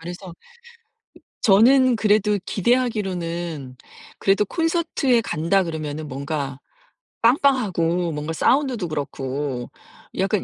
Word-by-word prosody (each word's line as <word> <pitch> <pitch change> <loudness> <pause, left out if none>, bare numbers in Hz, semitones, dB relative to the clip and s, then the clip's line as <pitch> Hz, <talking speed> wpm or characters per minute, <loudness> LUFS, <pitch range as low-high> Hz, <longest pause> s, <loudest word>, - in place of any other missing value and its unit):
그래서 175 +1 -8 1.1
저는 245 +4 +5
그래도 210 -1 +2
기대하기로는 175 - -1 0.4
그래도 195 +1 +2
콘서트에 325 - +1
간다 190 -1 +1
그러면은 155 -2 -5
뭔가 140 0 -4 0.6
빵빵하고 205 - +2
뭔가 150 +1 -4
사운드도 250 - +1
그렇고 140 -3 -4 0.5
약간 195 +1 0
185 Hz, 255 characters per minute, -22 LUFS, 155-230 Hz, 1.1 s, 저는